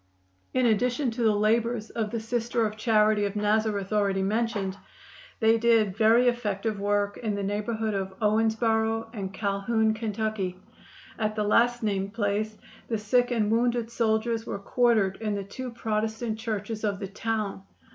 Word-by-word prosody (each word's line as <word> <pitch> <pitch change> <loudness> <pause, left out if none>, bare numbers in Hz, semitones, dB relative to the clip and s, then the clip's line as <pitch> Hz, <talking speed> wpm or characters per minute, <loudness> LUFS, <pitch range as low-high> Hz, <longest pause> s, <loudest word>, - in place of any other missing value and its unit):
In 255 -1 +2
addition 245 +4 +1
to 235 +2 -5
the 220 -2 +3
labors 220 +1 +1
of 220 -2 -2
the 230 +1 -3
Sisters 230 +1 -1
of 210 0 -3
Charity 215 -1 +3
of 200 +1 -3
Nazareth 210 -1 0
already 200 -2 +1
mentioned, 210 -2 -1 0.6
they 225 0 +4
did 225 -4 +3
very 230 +3 +5
effective 215 -3 -1
work 205 0 0
in 215 -3 -2
the 200 - -3
neighborhood 210 +2 -2
of 190 -1 -3
Owensboro 225 +1 +1
and 195 -4 -4
Calhoun, 215 +3 0
Ky. 215 -4 -2 0.6
At 215 -1 0
the 215 - 0
last 240 +3 +3
named 200 -1 -1
place 215 0 -1 0.3
the 225 - -1
sick 245 +4 +2
and 220 -4 +1
wounded 235 0 +1
soldiers 225 0 0
were 210 - -4
quartered 215 -2 +2
in 215 -2 -2
the 200 - -3
two 255 +6 -6
Protestant 220 0 -2
churches 220 -1 -4
of 205 -2 0
the 195 0 -5
town. 210 0 -3
220 Hz, 155 wpm, -27 LUFS, 205-230 Hz, 0.6 s, very